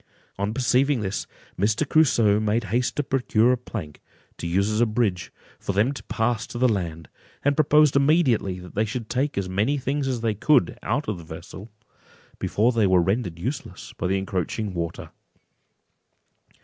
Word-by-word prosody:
On 100 Hz, +1 st, 0 dB
perceiving 130 Hz, +2 st, +2 dB
this, 95 Hz, -1 st, -3 dB, 0.3 s
Mr. 110 Hz, +9 st, +1 dB
Crusoe 120 Hz, -10 st, +4 dB
made 110 Hz, +2 st, 0 dB
haste 125 Hz, +1 st, +1 dB
to 145 Hz, -, 0 dB
procure 125 Hz, -3 st, +2 dB
a -, -, +3 dB
plank, 105 Hz, -11 st, -7 dB, 0.4 s
to 85 Hz, -, -3 dB
use 95 Hz, +4 st, +1 dB
as 110 Hz, +2 st, +1 dB
a 120 Hz, -, +4 dB
bridge, 105 Hz, -5 st, -1 dB, 0.3 s
for 100 Hz, -, -3 dB
them 105 Hz, +7 st, +2 dB
to 140 Hz, -, -7 dB
pass 115 Hz, +1 st, -1 dB
to -, -, -7 dB
the 130 Hz, +1 st, +4 dB
land, 85 Hz, -7 st, -2 dB, 0.4 s
and 145 Hz, 0 st, +3 dB
proposed 150 Hz, -1 st, +4 dB
immediately 140 Hz, -, +3 dB
that 90 Hz, -1 st, -11 dB
they 110 Hz, -, +1 dB
should 110 Hz, +1 st, -5 dB
take 135 Hz, +1 st, -1 dB
as 100 Hz, -2 st, -1 dB
many 105 Hz, +10 st, 0 dB
things 135 Hz, +1 st, -2 dB
as 125 Hz, -3 st, -2 dB
they 115 Hz, -2 st, +1 dB
could 110 Hz, -, +2 dB
out 140 Hz, +7 st, -1 dB
of 105 Hz, -5 st, -3 dB
the -, -, -10 dB
vessel, 85 Hz, +6 st, -10 dB, 0.7 s
before 115 Hz, +4 st, +2 dB
they 115 Hz, -4 st, +2 dB
were 95 Hz, -1 st, +4 dB
rendered 95 Hz, -1 st, 0 dB
useless 125 Hz, -, -6 dB
by 90 Hz, -, -3 dB
the 95 Hz, +1 st, +1 dB
encroaching 95 Hz, +2 st, -3 dB
water. 85 Hz, -1 st, -5 dB
110 Hz, 175 wpm, -24 LUFS, 95-130 Hz, 0.7 s, Crusoe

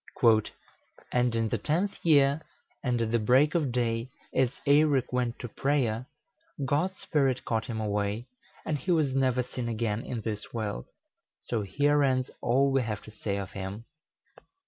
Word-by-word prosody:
"And 125 Hz, -1 st, +2 dB
in 115 Hz, -1 st, +1 dB
the -, -, -1 dB
tenth 180 Hz, +7 st, -1 dB
year, 145 Hz, -2 st, +4 dB, 0.4 s
and 125 Hz, -2 st, +1 dB
at 115 Hz, 0 st, 0 dB
break 130 Hz, +7 st, +4 dB
of 155 Hz, -7 st, +1 dB
day, 120 Hz, 0 st, -1 dB, 0.2 s
as 130 Hz, 0 st, +1 dB
Eirek 145 Hz, -3 st, +3 dB
went 125 Hz, -1 st, 0 dB
to 120 Hz, -, -6 dB
prayer, 125 Hz, -2 st, 0 dB, 0.6 s
God's 165 Hz, +8 st, 0 dB
Spirit 135 Hz, -5 st, 0 dB
caught 110 Hz, 0 st, -1 dB
him 115 Hz, -3 st, -3 dB
away, 105 Hz, +1 st, -1 dB, 0.4 s
and 150 Hz, -2 st, -1 dB
he 185 Hz, -, -7 dB
was 155 Hz, -6 st, +3 dB
never 130 Hz, -2 st, +2 dB
seen 125 Hz, -1 st, -5 dB
again 115 Hz, -1 st, -1 dB
in 120 Hz, -3 st, -4 dB
this 105 Hz, -1 st, -5 dB
world: 105 Hz, -, -3 dB, 0.6 s
so 115 Hz, -3 st, -1 dB
here 145 Hz, +9 st, +2 dB
ends 130 Hz, -2 st, +1 dB
all 135 Hz, +3 st, +3 dB
we 135 Hz, 0 st, +3 dB
have 110 Hz, -4 st, -4 dB
to 110 Hz, -, -11 dB
say 105 Hz, -1 st, -3 dB
of 100 Hz, -1 st, -5 dB
him." 100 Hz, +3 st, -6 dB
125 Hz, 160 wpm, -29 LUFS, 110-140 Hz, 0.6 s, year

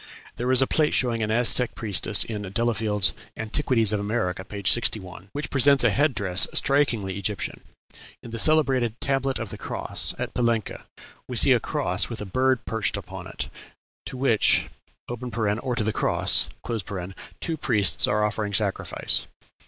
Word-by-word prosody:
There 125 Hz, +2 st, -1 dB
is 130 Hz, 0 st, +7 dB
a -, -, +2 dB
plate 150 Hz, +2 st, +1 dB
showing 120 Hz, -3 st, 0 dB
an 110 Hz, -, -1 dB
Aztec 120 Hz, +2 st, +3 dB
priestess 105 Hz, -1 st, +1 dB
in 105 Hz, -2 st, -6 dB
Delafield's 105 Hz, 0 st, 0 dB, 0.2 s
"Antiquities 115 Hz, -1 st, +2 dB
of 105 Hz, -, 0 dB
America," 100 Hz, -3 st, -2 dB
p. 100 Hz, +1 st, -8 dB
61, 95 Hz, -4 st, +1 dB
which 145 Hz, +5 st, -5 dB
presents 140 Hz, 0 st, +5 dB
a 120 Hz, -, +4 dB
head 145 Hz, +4 st, +1 dB
dress 95 Hz, -3 st, +3 dB
strikingly 115 Hz, -9 st, +1 dB
Egyptian. 100 Hz, +1 st, -4 dB, 0.6 s
In 115 Hz, -, -10 dB
the 115 Hz, -, -4 dB
celebrated 130 Hz, -6 st, +3 dB
"tablet 135 Hz, -1 st, 0 dB
of 110 Hz, -3 st, -6 dB
the -, -, -8 dB
cross," -, -, -1 dB
at -, -, -5 dB
Palenque, 115 Hz, -3 st, -1 dB, 0.5 s
we -, -, -4 dB
see -, -, +5 dB
a -, -, +5 dB
cross 90 Hz, +2 st, -1 dB
with 115 Hz, -, -6 dB
a 105 Hz, -, -5 dB
bird 130 Hz, +5 st, 0 dB
perched 110 Hz, -2 st, -1 dB
upon -, -, -9 dB
it, -, -, -5 dB, 0.6 s
to -, -, -6 dB
which 125 Hz, -5 st, +3 dB, 0.4 s
(or 120 Hz, 0 st, -3 dB
to 110 Hz, -, -1 dB
the 110 Hz, 0 st, -1 dB
cross) -, -, +2 dB, 0.9 s
two 165 Hz, -, -2 dB
priests 105 Hz, -, +2 dB
are 105 Hz, +1 st, +1 dB
offering 105 Hz, -1 st, -2 dB
sacrifice. 100 Hz, -2 st, -1 dB
115 Hz, 160 wpm, -24 LUFS, 105-125 Hz, 0.9 s, is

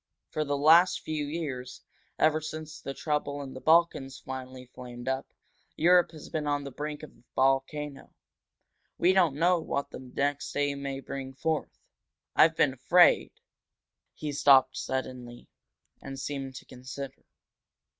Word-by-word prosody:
For 155 Hz, -, -1 dB
the 145 Hz, -1 st, -1 dB
last 165 Hz, +5 st, +5 dB
few 155 Hz, -2 st, -3 dB
years 140 Hz, -5 st, -5 dB, 0.3 s
ever 155 Hz, 0 st, +3 dB
since 155 Hz, 0 st, -7 dB
the 135 Hz, -, -6 dB
trouble 145 Hz, -2 st, -2 dB
in 135 Hz, -1 st, -8 dB
the 130 Hz, -, -9 dB
Balkans 160 Hz, -5 st, +3 dB
finally 130 Hz, -1 st, -8 dB
flamed 120 Hz, -1 st, -9 dB
up 130 Hz, 0 st, -2 dB, 0.4 s
Europe 175 Hz, +1 st, +5 dB
has 155 Hz, -2 st, -11 dB
been 155 Hz, -2 st, -3 dB
on 145 Hz, -1 st, 0 dB
the 140 Hz, -, -7 dB
brink 150 Hz, +3 st, -5 dB
of 155 Hz, -, -9 dB
a 115 Hz, -, -25 dB
volcano. 135 Hz, +2 st, 0 dB, 0.9 s
We 180 Hz, +2 st, +4 dB
don't 175 Hz, -7 st, +3 dB
know 175 Hz, +3 st, +3 dB
what 140 Hz, -3 st, -3 dB
the -, -, -8 dB
next 140 Hz, +2 st, -2 dB
day 145 Hz, 0 st, +1 dB
may 140 Hz, -1 st, -5 dB
bring 135 Hz, -1 st, -7 dB
forth. 160 Hz, +1 st, -2 dB, 0.6 s
I've 160 Hz, +1 st, +6 dB
been 145 Hz, -4 st, +3 dB
afraid 175 Hz, +7 st, +4 dB, 0.5 s
" -, -, -58 dB
He 150 Hz, -1 st, -4 dB
stopped, 135 Hz, -2 st, +5 dB
suddenly, 125 Hz, -2 st, -5 dB, 0.5 s
and 135 Hz, 0 st, -7 dB
seemed 135 Hz, -2 st, -5 dB
to -, -, -9 dB
consider. 130 Hz, +2 st, -8 dB
140 Hz, 150 wpm, -29 LUFS, 130-155 Hz, 0.9 s, I've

